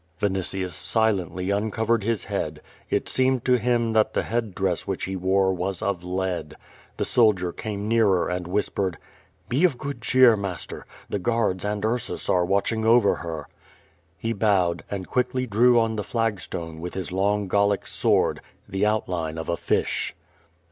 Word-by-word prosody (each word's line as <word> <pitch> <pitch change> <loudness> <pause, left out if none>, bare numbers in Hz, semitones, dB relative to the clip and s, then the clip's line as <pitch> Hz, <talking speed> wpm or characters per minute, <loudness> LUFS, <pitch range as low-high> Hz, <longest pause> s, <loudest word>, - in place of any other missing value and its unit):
Vinitius 95 -2 -1
silently 95 -4 0
uncovered 110 +2 0
his 115 -2 0
head. - - -3 0.3
It - - 0
seemed 130 -1 +1
to 125 -1 +4
him 115 -1 +1
that 110 -1 +2
the - - +1
head 115 -5 -2
dress 95 -3 -1
which 95 - -2
he 95 - -4
wore 95 +1 +2
was 90 0 -3
of 95 -3 -1
lead. 90 -3 -3 0.4
The - - 0
soldier 100 -7 +3
came 105 -2 -4
nearer 110 -5 +3
and 90 0 -3
whispered: 95 -2 -1 0.5
"Be 135 +8 +1
of 170 -9 +3
good 140 -2 -5
cheer, 125 -1 +6
master. 100 -5 -5 0.2
The 100 - -2
guards 105 -3 0
and 105 0 -2
Ursus 120 +2 -2
ar'j 90 -1 +2
watching 100 +4 +1
over 115 -1 +4
her." 80 -3 -6 0.7
He 115 +6 -2
bowed, 95 -5 +1
and 100 -2 -4
quickly 125 0 0
drew 120 +2 +4
on 115 -1 0
the 105 - -1
flag 115 -1 -1
stone, 80 -2 -6
with 90 +1 -6
his 95 -2 -4
long 100 +2 +1
Gallic 100 +1 +2
sword, - - +1 0.3
the 95 +2 0
outline 90 -7 -1
of 80 - -5
a 85 - +1
fish. 85 - -1
100 Hz, 165 wpm, -25 LUFS, 90-115 Hz, 0.7 s, cheer